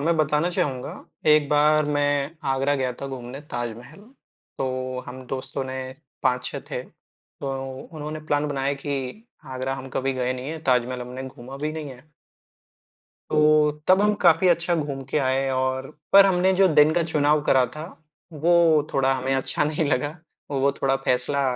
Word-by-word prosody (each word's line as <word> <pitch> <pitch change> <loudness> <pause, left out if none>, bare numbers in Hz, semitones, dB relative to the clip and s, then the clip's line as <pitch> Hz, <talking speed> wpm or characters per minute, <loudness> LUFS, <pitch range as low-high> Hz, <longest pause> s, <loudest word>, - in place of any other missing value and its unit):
मैं 165 +3 +1
बताना 155 +2 +2
चाहूँगा, 135 -7 -2 0.3
एक 150 -1 +5
बार 150 +1 +4
मैं 145 +1 0
आगरा 135 +2 +1
गया 130 -2 -1
था 140 - -4
घूमने 130 0 -7
ताजमहल, 120 - -6 0.6
तो 130 -1 -2
हम 130 +1 -8
दोस्तों 135 +2 -4
ने 130 0 -6 0.5
5-6 125 0 0
थे, - - -3
तो 135 -1 -8
उन्होंने 155 -1 -7
प्लान 145 0 +1
बनाया 140 -1 -1
कि 140 - -4 0.3
आगरा 130 +1 -2
हम 135 0 -8
कभी 135 +1 0
गए 130 -1 -1
नहीं 130 +1 -6
है, 160 - -5
ताजमहल 125 -2 +1
हमने 125 +2 -6
घूमा 130 +2 -10
भी 150 +2 -3
नहीं 155 -2 -6
है 130 +4 -15 1.2
तो, 150 0 +4 0.2
तब 185 +1 +6
हम 210 0 +3
काफ़ी 170 +2 +5
अच्छा 170 0 +2
घूम 145 -4 -3
के - - +1
आए 135 0 +1
और 130 +1 -1 0.2
पर 195 0 +9
हमने 185 0 +3
जो 190 0 +5
दिन 150 +1 +6
का 175 - +2
चुनाव 150 -2 +2
करा 130 -3 +4
था, 155 - -5 0.5
वो 160 -1 +3
थोड़ा 135 0 +2
हमें 130 +1 -1
अच्छा 135 +2 0
नहीं 155 +2 0
लगा, 145 +4 0 0.3
वो 140 0 +1
थोड़ा 135 0 +3
फैसला 125 +3 +1
140 Hz, 165 wpm, -24 LUFS, 130-155 Hz, 1.2 s, पर